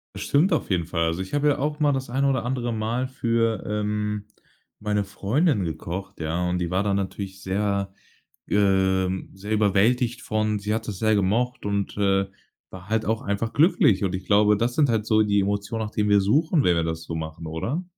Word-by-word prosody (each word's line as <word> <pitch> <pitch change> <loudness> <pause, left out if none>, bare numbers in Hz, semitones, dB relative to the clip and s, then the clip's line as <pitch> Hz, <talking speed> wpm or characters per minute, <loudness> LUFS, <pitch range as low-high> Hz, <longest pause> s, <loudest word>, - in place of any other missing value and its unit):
Das 100 - -6
stimmt 150 - +2
auf 155 - 0
jeden 90 -3 +1
Fall. 85 -1 -1
Also, 80 +3 -1
ich 95 - -7
habe 145 0 +2
ja 145 - +2
auch 150 +2 -2
mal 150 -1 +3
das 135 -2 -3
eine 135 +3 +1
oder 135 -4 0
andere 120 -1 -2
Mal 115 +3 -1
für, 115 -4 0
ähm, 105 0 -2 0.6
meine 105 -1 0
Freundin 105 - 0
gekocht, 85 +3 -5
ja, 85 +3 -1
und 90 0 0
die 90 -1 -1
war 95 +2 +1
dann 100 -1 0
natürlich 95 0 -5
sehr, 100 0 -1 0.6
ähm 95 -2 +1
sehr 100 +3 -6
überwältigt 110 +4 +2
von, 110 -1 0
sie 105 +1 -2
hat 110 0 -4
das 100 -3 -4
sehr 110 +1 +2
gemocht 110 +5 0
und, 100 -1 -2
äh, 100 -1 +2 0.4
war 95 +1 -11
halt 110 0 0
auch 110 +1 0
einfach 100 +3 -2
glücklich. 145 - +4
Und 95 -1 -1
ich 95 - -8
glaube, 105 +1 +4
das 120 +3 0
sind 150 -3 +4
halt 110 -2 0
so 110 -1 +4
die 100 -1 +2
Emotionen, 100 +3 -2
nach 105 - -6
denen 105 -1 0
wir 100 0 +5
suchen, 150 - +2
wenn 90 - +4
wir 85 - +1
das 80 0 -3
so 80 - -6
machen, 80 0 -6
oder? 115 - -3
105 Hz, 210 wpm, -24 LUFS, 95-115 Hz, 0.6 s, wir